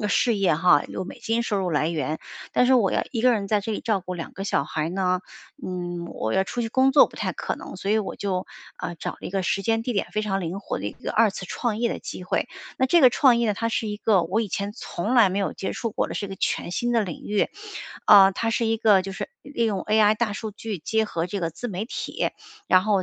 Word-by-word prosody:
嗯 210 - 0
事 230 +2 +2
业 195 -5 +3
哈， 165 -1 +4
有 - - -4
美 185 - -9
金 225 +1 0
收 210 -4 -1
入 185 -2 -1
来 155 +1 +1
源。 155 -1 -2 0.3
但 250 - +4
是 260 - +4
我 215 -6 +3
要 - - +1
1 230 - -1
个 250 +2 +5
人 205 -4 -1
在 210 0 +2
这 220 +2 -3
里 - - -3
照 215 -5 0
顾 180 0 -6
2 165 -2 -6
个 195 - -6
小 195 - +1
孩 155 +2 -2
呢， 185 0 0 0.4
嗯， 175 -1 -4
我 110 -8 -3
要 190 - +3
出 240 +4 -3
去 225 - -2
工 260 +2 +4
作 285 - +8
不 - - -18
太 - - -2
可 - - -3
能， - - -9
所 195 +2 -3
以 215 - +4
我 210 - -4
就 190 -2 -2 0.3
呃， 175 - -4
找 - - -4
了 - - -16
一 - - -5
个 195 -1 -1
时 195 - 0
间 225 +2 +1
地 245 - -2
点 200 - -1
非 215 - 0
常 195 -2 -1
灵 180 +2 -4
活 - - -4
的 100 - -4
一 - - -4
个 - - -6
2 220 -1 +4
次 190 - -7
创 230 +3 -2
业 235 0 +1
的 - - -5
机 180 - -7
会。 210 - -1 0.3
那 260 - +3
这 335 +3 +4
个 255 - +8
创 255 -3 +5
业 225 -3 +2
它 230 +4 -1
是 225 -1 -1
一 210 - -3
个 205 -5 +3
我 190 +7 0
以 220 - -2
前 200 +2 -3
从 210 -1 -4
来 230 -5 +7
没 190 +2 -2
有 195 - -1
接 190 - -4
触 230 -2 -3
过 - - -1
的， - - -5
是 200 - -3
个 195 - -6
全 - - -1
新 240 +4 -1
的 230 -2 +3
领 180 -5 -6
域。 210 -1 +1 0.6
呃， 195 -2 +8
它 225 +4 -2
是 230 - 0
一 225 0 +1
个 210 -4 +5
就 195 - -6
是 - - -5
利 235 -5 -1
用 200 -4 -1
AI 215 0 +4
大 225 -2 0
数 215 +1 -5
据 215 -1 -5
结 220 +8 0
合 170 -5 -2
这 200 +3 -4
个 165 -1 -1
自 245 +10 -6
媒 195 0 -3
体， 230 - -3 0.4
然 185 - +5
后 200 -2 +2
205 Hz, 295 characters per minute, -24 LUFS, 185-225 Hz, 0.6 s, 作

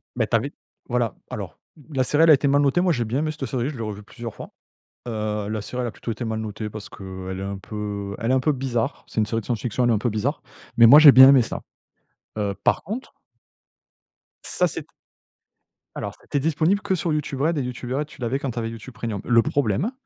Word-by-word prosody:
Mais - - 0
tu - - +1
avais, - - 0 0.4
voilà. 120 -2 0
Alors, - - -7 0.3
la 130 -1 +2
série, 150 +5 +3
elle 165 - +6
a - - +10
été 140 +1 +3
mal 145 +1 +4
notée. 145 +5 +3
Moi, 180 -2 +3
j'ai 120 -4 -1
bien 125 +6 -1
aimé 155 0 -1
cette 150 -3 -5
série, 125 +4 -1
je 150 - -7
l'ai 115 - -4
revue 105 -1 -6
plusieurs 115 +1 -8
fois. - - -10 0.6
Heu, 105 -2 -2
la 110 -1 -2
série, 125 +5 -5
elle 120 - -1
a - - -4
plutôt 115 - -6
été 120 +2 -4
mal 110 -1 -2
notée 110 0 -5
parce 105 -1 -9
qu'elle 95 -1 -7
est - - -5
un 100 0 -4
peu 100 -1 -5
elle 115 +3 0
est - - +4
un 130 - +4
peu 150 +4 +2
bizarre. 125 -4 -2
C'est - - -3
une 110 - +3
série 115 +2 -2
de - - -16
science-fiction, 120 +1 -1
elle - - +3
est - - +4
un - - +2
peu 120 +3 0
bizarre, 120 +8 -2 0.4
mais 115 - +8
moi, 145 +5 +10
j'ai 155 -2 +10
bien 130 +1 +10
aimé 135 -3 +7
ça. - - -4 0.8
Heu, 100 -2 -1
par - - +2
contre 225 +8 -6 1.3
Ça, - - +1
c'était - - -6 1.1
alors, - - -4
c'était 140 -2 -2
disponible 160 +6 +1
que 205 -2 -1
sur 170 -3 0
YouTube 145 -3 -3
Red 155 +3 +1
et - - +1
YouTube 125 0 -5
Red 145 +2 -1
tu 150 - -16
l'avais 125 +2 -1
quand 135 -2 -3
tu 120 - -4
avais 115 0 -2
YouTube 115 +2 -9
premium. 110 -4 -4
Le 120 -1 +4
problème, 140 - 0
120 Hz, 245 wpm, -23 LUFS, 110-140 Hz, 1.3 s, a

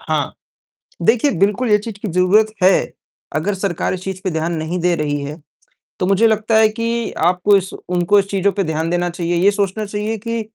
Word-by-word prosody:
हाँ, 155 -3 -2 0.7
देखिए 235 +10 +3
बिल्कुल 210 +5 +1
ये 210 - +6
चीज़ 210 0 -8
की 210 - -4
ज़रूरत 185 +5 +3 0.2
है, 185 +1 +3 0.4
अगर 190 +7 0
सरकार 190 -3 -2
इस 185 0 -6
चीज़ 190 -1 -5
पे 190 - 0
ध्यान 160 +1 -2
नहीं 160 +3 -3
दे 175 0 +2
रही 145 -2 -2
है, 150 +3 -7 0.6
तो 180 - +1
मुझे 195 +4 +4
लगता 220 +1 +1
है 220 0 +6
कि 230 +1 -2 0.2
आपको 180 +3 +3
इस 190 -1 -3
उनको 180 +3 +1
इस 195 - -1
चीज़ों 200 0 +1
पे 200 0 -1
ध्यान 160 -1 -2
देना 175 0 0
चाहिए। 175 0 -2
ये 190 +4 +4
सोचना 205 +1 -2
चाहिए 210 +2 -3
कि, 230 +2 -3
195 Hz, 205 wpm, -18 LUFS, 175-210 Hz, 0.7 s, ये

